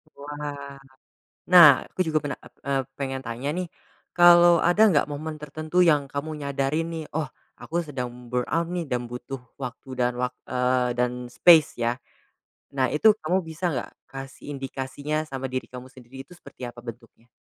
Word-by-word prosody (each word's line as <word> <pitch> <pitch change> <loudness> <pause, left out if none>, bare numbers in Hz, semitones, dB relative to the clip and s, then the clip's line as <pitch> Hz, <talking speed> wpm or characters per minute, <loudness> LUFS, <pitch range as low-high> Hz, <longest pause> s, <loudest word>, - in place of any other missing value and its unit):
Wah. 145 -1 -7 0.7
Nah, 180 -3 +10 0.2
aku - - -8
juga 155 -1 +2
pena 145 -3 -4
e - - -15 0.2
eee, 135 -1 +1 0.2
pengen 135 -1 -3
tanya 120 +4 -4
nih, 180 +4 -3 0.5
kalau 175 -1 +7
ada 175 +5 +4
nggak 150 -5 +3
momen 155 +2 -5
tertentu 155 +4 0
yang 150 -5 +3
kamu 140 +3 -5
nyadarin 140 +3 -1
nih, 160 -1 -4
oh, 155 - -1 0.3
aku 170 +2 -3
sedang 130 -4 -4 0.2
burnout 125 +7 0
nih 175 -2 -3
dan 125 -1 -1
butuh 125 +1 -7 0.2
waktu 130 0 -7
dan 125 0 +2
wak 125 0 -1
eee, 125 -1 +1
dan 125 0 -1
space 155 +5 +6
ya. 120 +1 0 0.8
Nah, 130 -1 +3
itu 215 +8 +6
kamu 175 +4 +1
bisa 160 +3 -8
nggak 125 - -4 0.2
kasih 135 0 -9
indikasinya 135 +2 -4
sama 135 -1 -4
diri 130 - -3
kamu 125 0 -10
sendiri 130 0 -15
itu 160 - -19
seperti 150 - -15
apa 120 0 -11
bentuknya? 115 0 -11
140 Hz, 165 wpm, -25 LUFS, 125-155 Hz, 0.8 s, Nah